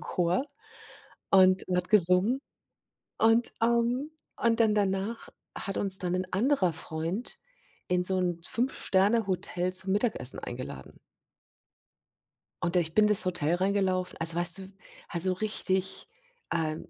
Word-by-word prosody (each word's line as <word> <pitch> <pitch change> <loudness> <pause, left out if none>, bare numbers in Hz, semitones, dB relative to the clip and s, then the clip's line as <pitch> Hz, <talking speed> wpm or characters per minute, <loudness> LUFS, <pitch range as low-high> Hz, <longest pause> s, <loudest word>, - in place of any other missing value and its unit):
Chor 180 +8 -1 0.9
und 185 -1 +4
hat 180 0 -2
gesungen. 200 +5 +2 0.8
Und, 225 +1 +2
ähm 235 +5 0 0.3
und 230 0 0
dann 220 -2 +3
danach 200 +2 -2 0.3
hat 195 - -6
uns 195 -1 +1
dann 180 -1 -3
'n 185 0 -2
anderer 200 - +1
Freund 160 +7 -6 0.5
in 180 0 0
so 190 +1 +2
'n 175 -2 -2
5-Sterne-Hotel 195 -6 -1
zum 185 +1 +5
Mittagessen 205 - +3
eingeladen. 120 - -9 1.6
Und 175 0 -1
ich 165 -2 -1
bin 215 -1 +4
das 210 -3 +7
Hotel 175 -3 -1
reingelaufen 185 -1 -1
also 165 0 -1
weißt 175 +1 +7
du, - - -8
w - - -12 0.4
also, 180 +2 +1
richtig, 190 -1 -3 0.4
äh 160 -2 -2
190 Hz, 125 wpm, -27 LUFS, 180-215 Hz, 1.6 s, das